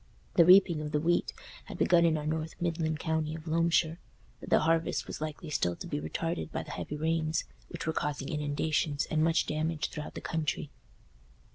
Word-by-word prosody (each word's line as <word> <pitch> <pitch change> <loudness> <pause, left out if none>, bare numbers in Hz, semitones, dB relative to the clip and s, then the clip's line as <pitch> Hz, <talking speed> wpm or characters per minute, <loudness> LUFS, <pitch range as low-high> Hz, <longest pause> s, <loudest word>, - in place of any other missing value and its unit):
The 170 - +6
reaping 180 -3 +6
of 150 0 -5
the 150 - +3
wheat 175 +3 +1 0.3
had - - -8
begun 170 -2 +4
in 160 -2 +3
our 150 - -4
north 155 +1 -2
midland 165 -2 -1
county 160 -1 -1
of 160 0 -9
Loamshire, 165 0 +2 0.4
but - - -9
the - - +5
harvest 165 +1 +1
was - - -7
likely 155 +1 -5
still 90 -11 0
to - - -8
be 75 - -3
retarded 165 - -3
by - - -3
the - - -9
heavy 150 - -5
rains, 160 0 0 0.3
which 170 -1 -6
were 160 - 0
causing 145 -2 -2
inundations 150 0 0
and 155 0 +2
much 165 0 +3
damage 155 +1 -1
throughout 150 0 -7
the - - -4
country. 155 -2 -2
160 Hz, 190 wpm, -30 LUFS, 150-165 Hz, 0.4 s, The